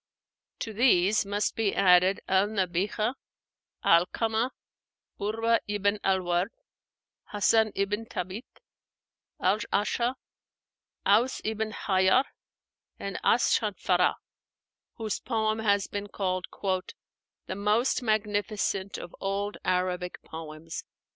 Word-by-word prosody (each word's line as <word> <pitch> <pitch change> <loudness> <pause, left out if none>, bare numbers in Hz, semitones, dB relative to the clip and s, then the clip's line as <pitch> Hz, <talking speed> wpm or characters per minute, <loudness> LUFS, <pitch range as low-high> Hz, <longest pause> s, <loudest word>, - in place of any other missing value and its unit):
To 220 - -4
these 210 -3 +3
must 205 +1 -1
be 220 -3 0
added 185 0 +5
al 190 +2 +3
Nabighah, 205 +3 0 0.7
'Alkamah, 220 +7 +3 0.7
Urwa 225 +3 +1
ibn 205 0 0
al 190 -1 +2
Ward, 175 +2 +1 0.8
Hássan 215 +1 +3
ibn 205 +3 -1
Thábit, 190 +6 -5 0.9
al 195 +3 +2
A'sha, 235 +5 +1 0.9
Aus 225 +6 +3
ibn 220 0 -2
Hájar, 190 +4 +3 0.7
and 195 -1 -5
as 240 - +4
Shánfarah, 185 -4 +2 0.8
whose 220 -3 -3
poem 220 -2 0
has 205 -2 +2
been 205 0 -5
called 185 -2 -2 1.0
"the - - -4
most 210 +7 +1
magnificent 205 -3 -1
of 175 - -9
old 200 +1 -2
Arabic 180 -1 -1
poems." 160 0 -8
205 Hz, 100 wpm, -28 LUFS, 185-220 Hz, 1.0 s, added